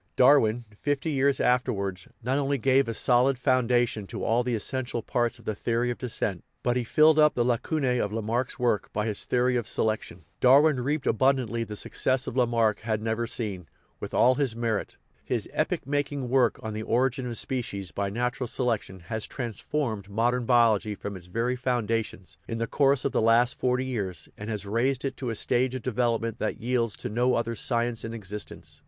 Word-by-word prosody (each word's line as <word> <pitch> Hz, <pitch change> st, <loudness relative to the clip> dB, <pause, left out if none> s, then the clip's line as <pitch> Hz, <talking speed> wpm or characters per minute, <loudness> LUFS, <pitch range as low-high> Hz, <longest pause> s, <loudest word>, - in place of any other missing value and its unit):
Darwin, 120 Hz, -3 st, +4 dB
fifty 145 Hz, +2 st, -1 dB
years 140 Hz, -1 st, +2 dB
afterwards, 100 Hz, -7 st, 0 dB, 0.2 s
not 130 Hz, +4 st, +1 dB
only 140 Hz, 0 st, 0 dB
gave 135 Hz, +1 st, +3 dB
a 115 Hz, -, -2 dB
solid 125 Hz, +3 st, +3 dB
founda 125 Hz, -2 st, +2 dB
tion 105 Hz, -3 st, -6 dB
to -, -, -6 dB
all 115 Hz, +2 st, +2 dB
the 120 Hz, -1 st, -1 dB
essential 120 Hz, +1 st, -3 dB
parts 120 Hz, +1 st, 0 dB
of 115 Hz, -, -18 dB
the 110 Hz, -, -1 dB
theory 120 Hz, +3 st, -1 dB
of 120 Hz, -, -6 dB
descent, 110 Hz, -6 st, -2 dB, 0.2 s
but 120 Hz, 0 st, +1 dB
he 125 Hz, -, 0 dB
filled 155 Hz, +6 st, +5 dB
up 150 Hz, 0 st, +5 dB
the 120 Hz, -, +1 dB
lacunae 125 Hz, +1 st, 0 dB
of 105 Hz, -, -1 dB
Lamarck's 115 Hz, +3 st, -2 dB
work 120 Hz, -6 st, 0 dB
by 105 Hz, 0 st, -1 dB
his 105 Hz, -3 st, -1 dB
theory 125 Hz, 0 st, +2 dB
of 120 Hz, -, -3 dB
selection. 110 Hz, 0 st, -2 dB
Darwin 140 Hz, +2 st, +5 dB
reaped 145 Hz, +4 st, -1 dB
abundantly 120 Hz, -1 st, +1 dB
the 105 Hz, -1 st, -7 dB
success 130 Hz, +5 st, -1 dB
that -, -, -5 dB
Lamarck 115 Hz, -4 st, +2 dB
had 110 Hz, -1 st, -2 dB
never 115 Hz, +1 st, -2 dB
seen, 100 Hz, -9 st, -4 dB, 0.3 s
with -, -, -6 dB
all 125 Hz, +2 st, +5 dB
his 130 Hz, -4 st, -1 dB
merit. 115 Hz, -3 st, -2 dB, 0.3 s
His -, -, -2 dB
epoch -, -, -1 dB
making 145 Hz, -2 st, -2 dB
work 125 Hz, -2 st, +3 dB
on 110 Hz, -1 st, -4 dB
The 110 Hz, -, -4 dB
Origin 125 Hz, +3 st, 0 dB
of 120 Hz, -2 st, -4 dB
Spe 130 Hz, -2 st, -1 dB
cies 100 Hz, -7 st, -6 dB
by 100 Hz, 0 st, -1 dB
Natural 125 Hz, +4 st, -2 dB
Selection 115 Hz, -7 st, -2 dB
has 110 Hz, +6 st, -4 dB
transformed 115 Hz, -2 st, -3 dB
modern 120 Hz, +3 st, 0 dB
biol 115 Hz, -3 st, +5 dB
ogy 105 Hz, -1 st, -6 dB
from 100 Hz, -1 st, -6 dB
its 90 Hz, -1 st, -10 dB
very 115 Hz, +7 st, -1 dB
foundations, 115 Hz, -8 st, -2 dB
in 115 Hz, -, -3 dB
the 115 Hz, -, -1 dB
course 140 Hz, +1 st, +2 dB
of 140 Hz, -, +1 dB
the -, -, +1 dB
last 115 Hz, +2 st, +4 dB
forty 125 Hz, +1 st, 0 dB
years, 100 Hz, -, -3 dB
and 105 Hz, +2 st, -7 dB
has 105 Hz, -2 st, -3 dB
raised 125 Hz, +6 st, 0 dB
it 135 Hz, -1 st, -2 dB
to 125 Hz, -, -3 dB
a 115 Hz, -, -2 dB
stage 125 Hz, +3 st, +1 dB
of 130 Hz, -, -5 dB
development 115 Hz, -2 st, -1 dB
that 110 Hz, -, -2 dB
yields 115 Hz, -2 st, 0 dB
to -, -, -5 dB
no 125 Hz, +3 st, +1 dB
other 115 Hz, 0 st, -1 dB
science 120 Hz, 0 st, 0 dB
in 115 Hz, 0 st, -5 dB
existence. 105 Hz, -1 st, -8 dB
120 Hz, 200 wpm, -27 LUFS, 110-130 Hz, 0.3 s, filled